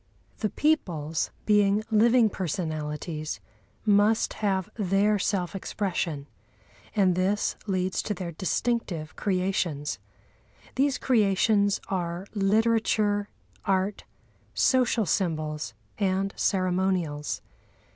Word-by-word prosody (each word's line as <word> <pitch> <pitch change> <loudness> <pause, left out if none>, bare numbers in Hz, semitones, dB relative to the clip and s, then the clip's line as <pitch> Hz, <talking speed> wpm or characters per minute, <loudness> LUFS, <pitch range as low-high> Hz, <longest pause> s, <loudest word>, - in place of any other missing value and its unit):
The 215 - 0
peoples, 170 - 0 0.2
being 205 0 +3
living 230 +2 +5
personalities, 155 -3 -3 0.5
must 210 +1 +3
have 190 -3 +1
their 205 0 +2
self 185 -2 -1
expression, 175 -7 -2 0.7
and 190 -3 +4
this 190 +4 +1
leads 185 -1 0
to 210 - -3
their 175 -2 -5
distinctive 180 -2 -2
creations. 180 -6 -1 0.7
These 275 0 +2
creations 205 -3 +3
are 175 -1 -2
literature, 210 0 +2 0.3
art, 195 +1 0 0.5
social 245 -4 +3
symbols 155 -4 -1 0.2
and 195 0 0
ceremonials. 185 -5 0
195 Hz, 85 wpm, -27 LUFS, 175-210 Hz, 0.7 s, living